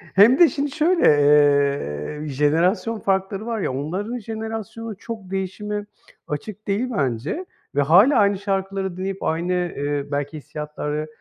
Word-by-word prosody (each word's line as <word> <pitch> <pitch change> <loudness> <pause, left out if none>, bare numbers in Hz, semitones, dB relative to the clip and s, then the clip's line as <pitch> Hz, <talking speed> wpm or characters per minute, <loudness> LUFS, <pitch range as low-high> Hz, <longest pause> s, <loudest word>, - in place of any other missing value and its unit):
hem 230 - +7
de 345 - +8
şimdi 285 -2 -2
şöyle. 335 +4 +2
Eee, 145 - +3
jenerasyon 165 - +1
farkları 195 +2 -1
var 230 -2 -2
ya, 130 - -1
onların 190 - -3
jenerasyonu 220 0 -6
çok 220 -5 -8
değişime 205 +2 -3 0.4
açık 205 +8 -6
değil 210 +6 0
bence 140 - -1 0.3
ve 145 - +3
hâlâ 185 - +6
aynı 200 -1 +3
şarkıları 195 -2 -2
dinleyip 195 +1 -4
aynı, 170 +3 -1
eee, 145 -5 -2
belki 145 +2 -2
hissiyatları, 150 +1 -5
190 Hz, 135 wpm, -22 LUFS, 150-215 Hz, 0.4 s, de